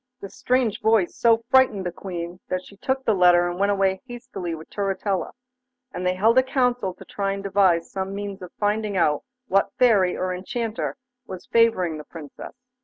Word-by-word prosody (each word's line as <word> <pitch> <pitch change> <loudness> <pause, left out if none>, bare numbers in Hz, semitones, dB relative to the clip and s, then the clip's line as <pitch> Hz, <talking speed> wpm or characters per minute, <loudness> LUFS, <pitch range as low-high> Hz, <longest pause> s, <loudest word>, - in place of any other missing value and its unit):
This 200 - -9
strange 250 -4 0
voice 220 -5 +2
so 230 -1 +3
frightened 260 -8 +4
the 175 - -2
Queen 175 -1 -6
that 185 0 -2
she 200 - -15
took 265 +6 -2
the 220 - +3
letter 175 -2 +5
and 175 +1 -4
went 200 +1 +2
away 195 -1 +1
hastily 195 -8 -6
with 160 0 -11
Turritella, 195 -1 -2 0.6
and 180 - -4
they 180 - +1
held 225 +6 +4
a - - +6
council 250 -7 0
to - - -13
try 195 -1 -2
and 195 0 -6
devise 190 -4 +2
some 190 0 -4
means 200 -1 -6
of 180 -1 -9
finding 210 -1 0
out 150 -4 +2 0.3
what 195 -2 +2
Fairy 210 -8 +4
or 185 0 -1
Enchanter 225 +6 -4 0.3
was 185 -1 -8
favouring 185 -9 +2
the - - -8
Princess. 150 -2 -10
195 Hz, 185 wpm, -24 LUFS, 180-225 Hz, 0.6 s, a